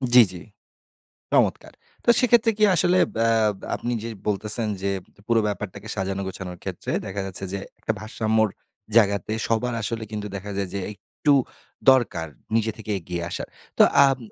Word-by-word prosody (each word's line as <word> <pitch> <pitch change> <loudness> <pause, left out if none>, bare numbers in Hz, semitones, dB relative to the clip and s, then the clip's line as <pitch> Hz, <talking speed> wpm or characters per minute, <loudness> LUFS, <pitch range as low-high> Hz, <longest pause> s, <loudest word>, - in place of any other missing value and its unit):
জ্বী, 125 - +11
জ্বী। 90 -1 -9 0.9
চমৎকার! - - +2 0.3
তো - - +1
সেক্ষেত্রে 240 -2 +4
কি 215 - +2
আসলে 175 +3 +4 0.2
ব্যা 115 +1 +2 0.5
আপনি 120 - -3
যে 115 - -4 0.2
বলতেছেন 105 +2 +1
যে 100 - 0 0.4
পুরো 115 -1 +4
ব্যাপারটাকে 105 0 -5
সাজানো 95 -1 -2
গোছানোর 90 -1 -6
ক্ষেত্রে - - -5
দেখা 100 +1 -3
যাচ্ছে 95 0 -5
যে, 100 - -2 0.2
একটা 110 - -1
ভারসাম্যর 110 0 +1 0.5
জায়গাতে 100 -1 +3 0.2
সবার 120 +2 0
আসলে 110 +1 -3
কিন্তু 105 -1 -4
দেখা 100 +1 -5
যায় 100 -1 0
যে, 100 - -2
একটু 145 +8 0 0.6
দরকার 100 -11 +1 0.3
নিজে 115 0 +2
থেকে 110 -1 -6
এগিয়ে 85 0 -5
আসার। - - -4 0.3
তো - - +8 0.2
আম 135 -1 +2
105 Hz, 155 wpm, -24 LUFS, 100-115 Hz, 0.9 s, জ্বী